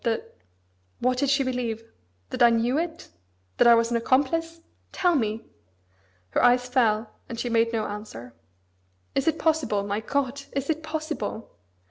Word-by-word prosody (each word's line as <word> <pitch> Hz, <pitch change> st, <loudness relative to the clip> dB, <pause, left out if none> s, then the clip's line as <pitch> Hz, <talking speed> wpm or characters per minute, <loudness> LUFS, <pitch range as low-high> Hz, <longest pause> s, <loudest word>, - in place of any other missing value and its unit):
that..." 230 Hz, -2 st, -2 dB, 0.6 s
"What 255 Hz, 0 st, 0 dB
did 280 Hz, -, +1 dB
she 275 Hz, 0 st, +3 dB
believe? 245 Hz, -3 st, -2 dB, 0.5 s
That -, -, -4 dB
I 240 Hz, -, +8 dB
knew 235 Hz, +5 st, +2 dB
it? 335 Hz, -1 st, -4 dB, 0.5 s
That -, -, +5 dB
I 235 Hz, -, +9 dB
was 230 Hz, 0 st, +1 dB
an 235 Hz, -, +2 dB
accomplice? 290 Hz, +7 st, +1 dB, 0.3 s
Tell 355 Hz, -2 st, +2 dB
me!" 225 Hz, -6 st, -1 dB, 0.9 s
Her -, -, +1 dB
eyes 245 Hz, 0 st, +4 dB
fell, 225 Hz, -4 st, +1 dB, 0.2 s
and 230 Hz, -, -6 dB
she 245 Hz, -, -2 dB
made 230 Hz, 0 st, +3 dB
no 220 Hz, -2 st, -1 dB
answer. 205 Hz, -, -8 dB, 0.8 s
"Is 275 Hz, -, 0 dB
it 325 Hz, 0 st, +2 dB
possible, 305 Hz, -11 st, +1 dB
my 205 Hz, +1 st, -2 dB
God, 275 Hz, +4 st, -2 dB
is 275 Hz, +3 st, -1 dB
it 315 Hz, 0 st, -3 dB
possible? 310 Hz, -7 st, -4 dB
245 Hz, 160 wpm, -26 LUFS, 225-280 Hz, 0.9 s, I